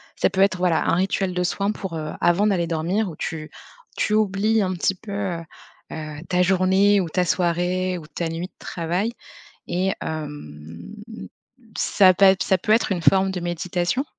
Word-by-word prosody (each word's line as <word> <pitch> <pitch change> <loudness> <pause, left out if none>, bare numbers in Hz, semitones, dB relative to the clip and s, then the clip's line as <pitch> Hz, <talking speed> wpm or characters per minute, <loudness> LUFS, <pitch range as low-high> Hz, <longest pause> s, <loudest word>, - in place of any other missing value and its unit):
ça - - +1
peut 190 - 0
être, 195 -1 +3
voilà, 180 -3 +1
un - - +3
rituel 190 0 0
de 180 - 0
soin 200 +3 0
pour, 190 -5 -6
heu, 155 -1 -4
avant 180 +5 +3
d'aller 185 -5 +1
dormir 170 +6 -1
où 165 - -9
tu 155 0 -5 0.4
tu 210 - 0
oublies 215 +1 +2
un 185 -1 -1
petit 185 +2 0
peu, 200 +2 -11
heu, 190 -4 -3 0.5
heu, 155 -1 -6
ta 180 -1 +1
journée 190 +2 +3
ou 175 - -4
ta 180 +3 +1
soirée 180 +1 0
ou 155 - -12
ta 170 +1 -4
nuit 165 +2 -4
de - - -42
travail 175 +7 -2 0.6
et 185 +2 0
hem 85 - -7 0.8
ça 185 -2 +5
pa 190 +1 +6
ça 190 - +2
peut 215 +4 0
être 220 -2 +3
une 180 - -2
forme 190 +2 +4
de 180 - -4
méditation, 175 - -1
180 Hz, 180 wpm, -23 LUFS, 170-195 Hz, 0.8 s, pa